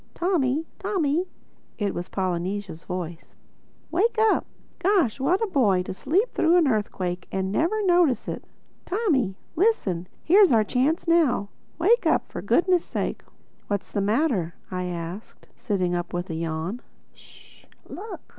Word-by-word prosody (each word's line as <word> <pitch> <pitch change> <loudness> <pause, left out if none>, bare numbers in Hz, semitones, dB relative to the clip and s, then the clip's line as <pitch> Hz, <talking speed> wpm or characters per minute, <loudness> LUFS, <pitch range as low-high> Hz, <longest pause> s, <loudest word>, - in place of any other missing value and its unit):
"Tommy!—Tommy!" 335 +1 0 0.5
(it 205 -3 -1
was 175 - -5
Polynesia's 185 -1 -3
voice) 175 -2 -6 0.6
"Wake 445 +7 +1
up!—Gosh, 385 - +1
what 360 +11 +2
a - - +1
boy, 215 - +2
to - - -5
sleep 360 - 0
through 335 +2 +4
an 335 -4 +4
earthquake 185 -6 -1
and 190 0 -1
never 380 - +1
notice 345 - +3
it!—Tommy, 315 - -2 0.2
listen: 220 - +1 0.2
here's 385 +1 +6
our 225 -3 +5
chance 270 +10 0
now. 310 -12 +3 0.3
Wake 440 +9 +3
up, - - +1
for - - -5
goodness' 355 -1 +3
sake!" - - -3 0.5
"What's 200 -1 -3
the 200 - 0
matter?" 205 - +1 0.2
I 180 0 -2
asked 175 +3 -7
sitting 185 -5 -1
up 175 0 -3
with 175 0 -3
a - - -3
yawn. 165 +7 -3 0.3
"Sh!—Look!" 425 +4 -12
250 Hz, 130 wpm, -25 LUFS, -, 0.6 s, here's